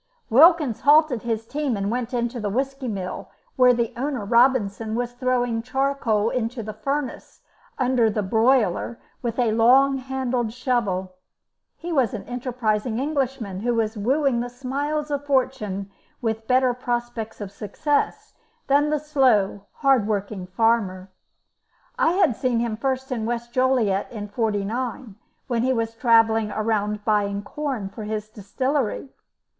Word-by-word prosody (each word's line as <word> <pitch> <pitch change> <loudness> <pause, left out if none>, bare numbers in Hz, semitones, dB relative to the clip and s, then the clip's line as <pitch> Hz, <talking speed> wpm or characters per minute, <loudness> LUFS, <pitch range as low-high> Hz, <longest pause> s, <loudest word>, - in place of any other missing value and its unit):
Wilkins 300 - +5
halted 295 -5 +4
his 225 -2 -2
team 280 -2 -2
and 200 +1 -2
went 245 0 -2
into 240 0 -2
the 210 -2 -2
whisky 270 +4 -2
mill, 190 -5 -5 0.3
where 250 -1 +6
the 235 0 0
owner, 260 -3 -3
Robinson, 225 -2 +2
was 245 0 -2
throwing 245 -2 0
charcoal 255 -4 0
into 235 -1 -2
the 215 0 -6
furnace 280 +1 -4 0.4
under 255 -2 +2
his 210 -1 -2
boiler 230 -1 +2 0.2
with 235 -2 -3
a 240 -3 +2
long 265 +5 +4
handled 255 -3 -2
shovel. 200 -8 -1 0.6
He 345 +1 -6
was 260 -4 +2
an 205 - -6
enterprising 240 -3 -2
Englishman 265 -8 -2
who 240 +3 0
was 225 -1 0
wooing 260 +4 +1
the 245 +1 -3
smiles 285 +4 -3
of 285 0 -1
fortune 230 -8 -1 0.3
with 220 -2 -3
better 255 -1 +3
prospects 240 -2 -4
of 205 -2 -6
success 285 +9 -2 0.3
than 285 +2 +3
the 305 - +1
slow, 250 -10 +1 0.2
hard 260 -6 +4
working 200 -3 -3
farmer. 195 -3 0 0.9
I 330 - +3
had 355 - +3
seen 250 -1 0
him 230 -2 -1
first 265 +3 -2
in 225 -3 -2
West 240 0 -4
Joliet 245 -7 +1
in 210 -3 -6
'49, 225 +2 -2 0.3
when 240 -3 -1
he 260 +2 +2
was 230 -2 -1
travelling 225 -2 +3
around 210 -1 -1
buying 205 -2 +1
corn 265 -4 -4
for 220 - -9
his 215 0 -4
distillery. 255 +5 -2
240 Hz, 145 wpm, -23 LUFS, 215-265 Hz, 0.9 s, where